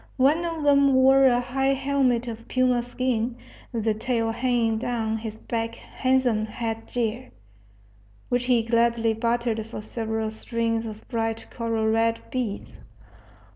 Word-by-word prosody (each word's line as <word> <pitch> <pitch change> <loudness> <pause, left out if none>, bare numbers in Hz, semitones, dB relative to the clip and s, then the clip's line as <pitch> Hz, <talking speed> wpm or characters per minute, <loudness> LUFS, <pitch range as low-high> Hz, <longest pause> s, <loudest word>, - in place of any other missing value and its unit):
One 290 +6 +3
of 330 -2 -3
them 280 -2 +5
wore 270 +1 +6
a 245 -2 +5
high 270 +2 0
helmet 265 -3 +1
of 230 0 -7
puma 255 -1 +2
skin, 245 -1 -1 0.4
with 225 -3 -3
the 220 - +3
tail 225 0 -1
hanging 235 -2 +1
down 225 -2 -1
his 220 -1 -6
back 230 0 -3
handsome 250 -5 0
head 225 0 -4
gear, 240 +1 -2 1.0
which 245 0 0
he 245 -2 +3
gladly 230 0 +2
bartered 230 0 0
for 220 -2 -7
several 220 0 -3
strings 230 0 -2
of 215 0 -9
bright 225 -1 -2
coral 230 -2 -1
red 225 +1 +2
beads. 240 -6 -4
235 Hz, 140 wpm, -25 LUFS, 225-255 Hz, 1.0 s, wore